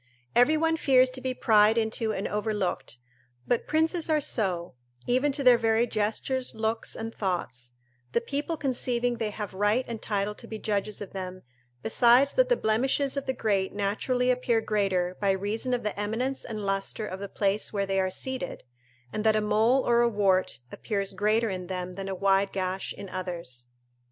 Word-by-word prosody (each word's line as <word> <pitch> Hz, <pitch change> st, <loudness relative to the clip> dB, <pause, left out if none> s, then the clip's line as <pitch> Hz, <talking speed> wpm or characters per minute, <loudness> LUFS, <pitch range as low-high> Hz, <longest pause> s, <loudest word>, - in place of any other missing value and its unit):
Every 275 Hz, +6 st, +5 dB
one 325 Hz, +1 st, +1 dB
fears 260 Hz, -4 st, +4 dB
to 260 Hz, 0 st, -4 dB
be 255 Hz, -1 st, -2 dB
pried 215 Hz, -1 st, +4 dB
into 220 Hz, 0 st, 0 dB
and 200 Hz, -1 st, -2 dB
overlooked; 210 Hz, -, -2 dB, 0.5 s
but 240 Hz, -, 0 dB
princes 320 Hz, +2 st, +1 dB
are 310 Hz, -1 st, +3 dB
so, 185 Hz, -10 st, -1 dB, 0.3 s
even 255 Hz, +4 st, +2 dB
to 280 Hz, 0 st, -1 dB
their 245 Hz, -2 st, +7 dB
very 225 Hz, 0 st, +3 dB
gestures, 230 Hz, +4 st, -1 dB
looks 220 Hz, +1 st, -1 dB
and 225 Hz, 0 st, -5 dB
thoughts, 130 Hz, -, -3 dB, 0.4 s
the -, -, +3 dB
people 285 Hz, +7 st, -3 dB
conceiving 245 Hz, -3 st, 0 dB
they 220 Hz, -2 st, -1 dB
have 210 Hz, -1 st, -6 dB
right 205 Hz, +6 st, +1 dB
and 230 Hz, -2 st, -6 dB
title 205 Hz, 0 st, -1 dB
to -, -, -10 dB
be 220 Hz, -, -5 dB
judges 210 Hz, -1 st, -2 dB
of 200 Hz, -, -7 dB
them 185 Hz, -1 st, -6 dB, 0.4 s
besides 245 Hz, +4 st, +4 dB
that -, -, +3 dB
the -, -, +3 dB
blemishes 265 Hz, +5 st, +1 dB
of 280 Hz, -1 st, -3 dB
the 260 Hz, -, +1 dB
great 200 Hz, -5 st, 0 dB
naturally 245 Hz, +5 st, 0 dB
appear 245 Hz, -2 st, +1 dB
greater 190 Hz, -5 st, 0 dB
by 200 Hz, -, +2 dB
reason 210 Hz, +6 st, -3 dB
of 245 Hz, -1 st, 0 dB
the 210 Hz, -, -2 dB
eminence 235 Hz, +6 st, -2 dB
and 215 Hz, -2 st, -5 dB
lustre 195 Hz, +2 st, -2 dB
of 190 Hz, -2 st, -6 dB
the 200 Hz, 0 st, -6 dB
place 200 Hz, +1 st, 0 dB
where 200 Hz, -2 st, -1 dB
they 195 Hz, 0 st, 0 dB
are 185 Hz, -, 0 dB
seated, 260 Hz, 0 st, -4 dB, 0.5 s
and 215 Hz, -, -2 dB
that 220 Hz, -1 st, +4 dB
a -, -, +3 dB
mole 225 Hz, +5 st, +2 dB
or 235 Hz, 0 st, +4 dB
a 240 Hz, -, +4 dB
wart 190 Hz, -, +1 dB
appears 200 Hz, -3 st, -3 dB
greater 215 Hz, +3 st, +1 dB
in 180 Hz, -1 st, -5 dB
them 180 Hz, -1 st, -4 dB
than 195 Hz, +1 st, -6 dB
a 190 Hz, -, -3 dB
wide 195 Hz, +1 st, +2 dB
gash 190 Hz, 0 st, -3 dB
in 200 Hz, -, -8 dB
others. 170 Hz, -10 st, -6 dB
215 Hz, 185 wpm, -27 LUFS, 195-245 Hz, 0.5 s, their